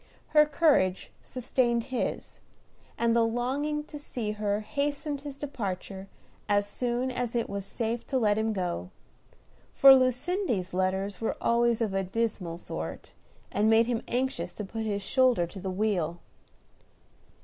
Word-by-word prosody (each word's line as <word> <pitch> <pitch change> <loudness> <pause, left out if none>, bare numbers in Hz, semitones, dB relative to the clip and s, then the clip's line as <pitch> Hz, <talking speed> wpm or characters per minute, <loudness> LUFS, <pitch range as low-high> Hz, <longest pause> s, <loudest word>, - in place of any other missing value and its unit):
Her 300 -1 +6
courage 280 - +2
sustained 240 -2 0
his, 250 - -3 0.6
and 230 0 +2
the 235 - +5
longing 265 +6 -1
to 295 0 -9
see 235 -7 -4
her 210 0 -1
hastened 285 +3 -2
his 285 -1 -7
departure 195 -8 -5 0.4
as 205 0 +3
soon 245 +4 -2
as 245 -1 -3
it 235 - 0
was 200 -1 -4
safe 230 +3 -3
to 265 - 0
let 210 -4 +3
him 220 +1 0
go; 175 - -3 0.9
for 275 0 +10
Lucindy's 255 - +1
letters 190 +2 -1
were 225 - -1
always 235 0 +2
of 215 -4 0
a 195 - +1
dismal 190 -4 -2
sort, 80 - -6 0.4
and 210 +2 +2
made 225 +1 +5
him 235 -1 -1
anxious 260 +2 -1
to 210 - -5
put 220 +2 -4
his 200 -1 -2
shoulder 255 -5 +3
to 190 +3 -10
the 190 0 -4
wheel. 185 -4 -1
225 Hz, 150 wpm, -28 LUFS, 200-255 Hz, 0.9 s, for